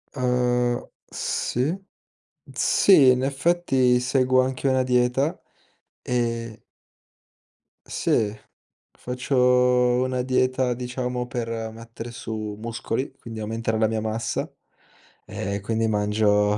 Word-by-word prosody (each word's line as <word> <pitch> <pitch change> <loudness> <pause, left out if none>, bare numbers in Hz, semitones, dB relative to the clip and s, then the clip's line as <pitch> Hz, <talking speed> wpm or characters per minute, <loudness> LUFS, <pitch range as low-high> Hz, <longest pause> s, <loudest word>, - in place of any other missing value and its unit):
Uhm, 125 -1 0 0.2
sì, 135 +8 -1 0.8
sì 160 -10 +5
in 125 0 +3
effetti 135 -3 +2
seguo 130 0 +2
anche 130 +1 -2
una 130 -1 +3
dieta 125 +6 +1 0.6
ehm 115 -2 -2 1.3
Sì. 105 -1 0 0.6
Faccio 125 +3 -4 0.7
una 130 -1 -1
dieta 130 0 +1
diciamo 125 0 -3
per 115 -2 -4
mettere 115 +1 -9
su 110 -2 -5
muscoli, 115 +3 -3
quindi 115 -1 -8
aumentare 110 +1 -2
la 110 - +3
mia 110 0 -2
massa 110 +1 -3 0.7
e 100 +1 -4
quindi 115 +2 0
mangio 105 -1 +2
125 Hz, 100 wpm, -24 LUFS, 110-130 Hz, 1.3 s, sì